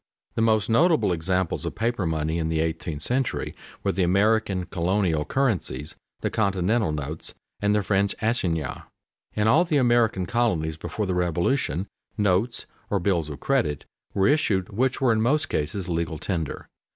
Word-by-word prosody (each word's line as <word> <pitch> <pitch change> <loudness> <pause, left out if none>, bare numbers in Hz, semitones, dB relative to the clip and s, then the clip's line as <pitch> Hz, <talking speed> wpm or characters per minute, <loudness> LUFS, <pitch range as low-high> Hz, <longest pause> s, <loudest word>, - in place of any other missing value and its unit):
_The - - 0
most 110 -2 +3
notable 155 - +3
examples 90 +1 -1
of - - -4
paper 115 -5 0
money 80 +1 -1
in 80 -1 -1
the 80 -1 0
eighteenth 80 -2 -2
century 130 0 -1 0.3
were - - +2
the 95 - -1
American 100 +1 +2
colonial 90 -4 0
currencies, 90 - -1 0.3
the - - -1
continental 100 -1 +1
notes, 75 +1 -5 0.3
and 105 0 +2
the 105 - +2
French 100 0 +1
assignats._ 85 - -1 0.5
In 105 0 +2
all 155 +10 +5
the 165 -4 +1
American 120 -7 +3
colonies 90 -10 0
before 85 +6 -3
the 95 - -1
Revolution 90 - 0 0.3
notes 105 +4 +1 0.2
or 100 - +1
bills 85 -4 0
of 75 - -7
credit 75 -2 0 0.3
were 95 - +3
issued 105 -11 +2
which 130 +6 0
were 130 -3 +4
in 110 - +1
most 145 +5 +2
cases 80 +5 -2
legal 85 -2 -2
tender. 80 -2 -3
95 Hz, 160 wpm, -25 LUFS, 80-115 Hz, 0.5 s, all